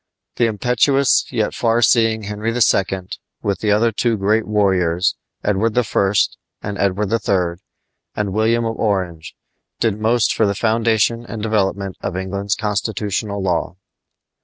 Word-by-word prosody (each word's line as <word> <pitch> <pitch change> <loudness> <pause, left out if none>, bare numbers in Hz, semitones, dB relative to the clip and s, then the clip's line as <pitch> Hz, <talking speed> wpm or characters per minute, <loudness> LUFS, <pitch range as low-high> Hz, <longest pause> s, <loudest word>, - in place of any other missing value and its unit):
The 120 - +3
impetuous 125 +5 +2
yet 110 -4 -1
far 115 0 +1
seeing 115 -2 +3
Henry 105 +2 -3
II., 95 -5 +2 0.4
with 100 -2 -1
the 105 - -1
other 110 +3 +3
two 115 +1 0
great 105 +3 +1
warriors, 95 -3 +1 0.3
Edward 105 +3 0
I. 100 -4 +1 0.5
and 100 0 -5
Edward 100 +1 0
III., 90 -6 0 0.5
and 100 -2 -2
William 115 +2 +1
of 115 0 -3
Orange, 90 -7 -2 0.4
did 110 -2 0
most 110 -1 +2
for 110 - +2
the 100 - -1
foundation 115 +1 +1
and 110 -3 -7
development 100 -3 -1
of 95 -2 -3
England's 100 +1 -2
constitutional 105 -1 -2
law. 90 -2 -1
105 Hz, 135 wpm, -19 LUFS, 100-115 Hz, 0.5 s, The